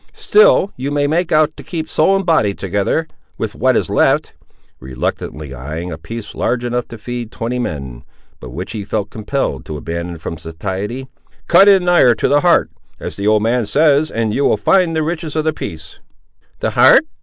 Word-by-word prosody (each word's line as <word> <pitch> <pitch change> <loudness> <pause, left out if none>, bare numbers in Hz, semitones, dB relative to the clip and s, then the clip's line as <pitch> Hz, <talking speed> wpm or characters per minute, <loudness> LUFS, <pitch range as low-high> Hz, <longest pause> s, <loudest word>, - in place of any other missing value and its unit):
Still 430 - +4
you 130 +3 -4
may 145 0 0
make 160 +4 0
out 155 0 +3
to - - -10
keep 160 -3 -5
soul 190 +6 +2
and 195 -1 -1
body 110 - +2
together, 100 - -1 0.3
with - - -3
what - - +2
is - - 0
left," - - +1 0.5
reluctantly 65 +3 -5
eyeing 80 +7 -6
a 80 - -5
piece 115 +4 -8
large 120 +1 -1
enough 120 0 -2
to 115 - -9
feed 120 +1 -6
twenty 120 +2 -3
men, 70 - -5 0.4
but 65 - -9
which 90 +11 -6
he 110 -3 -5
felt 105 0 -3
compelled 110 - -3
to 75 - -5
abandon 85 +2 -5
from 80 0 -7
satiety; 95 - -5 0.4
"cut 190 +4 +6
in 195 -3 +5
nigher 175 -9 +5
to - - 0
the 145 +1 +3
heart, 175 -1 +3 0.3
as - - -6
the 100 +1 -3
old 105 0 +3
man 115 -1 +1
says, 150 +2 +3
and 110 -2 -1
you 140 - 0
will - - +3
find 170 - +2
the 160 - +1
riches 160 -1 -4
of 155 - 0
the 155 0 0
piece." 80 - -8 0.6
"The - - 0
heart!" - - +6
115 Hz, 195 wpm, -17 LUFS, -, 0.6 s, cut